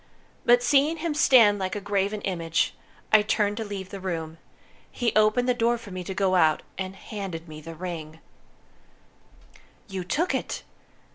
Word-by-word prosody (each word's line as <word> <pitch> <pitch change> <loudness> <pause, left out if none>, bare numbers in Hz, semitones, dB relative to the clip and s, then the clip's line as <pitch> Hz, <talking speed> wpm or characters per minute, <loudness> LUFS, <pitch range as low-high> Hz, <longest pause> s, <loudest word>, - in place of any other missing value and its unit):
But 245 0 +5
seeing 285 +6 +3
him 325 0 -2
stand 230 -8 +5
like 190 0 -2
a - - -2
graven 205 +1 -1
image, 170 -3 0 0.4
I 215 - +8
turned 210 -1 +1
to 225 - -2
leave 200 -3 -6
the 195 - -6
room. 165 -3 -4 0.5
He 235 -2 -1
opened 215 +3 +3
the 250 - +4
door 235 0 +1
for 225 -4 -12
me 185 0 -5
to 190 - -5
go 190 -1 +1
out, 160 -4 +3
and 190 0 -5
handed 195 -6 -6
me 155 -1 -9
the 165 +2 -9
ring." 160 -2 -6 1.7
"You 190 -3 -4
took 315 - 0
it!" - - -3
200 Hz, 165 wpm, -26 LUFS, 180-230 Hz, 1.7 s, I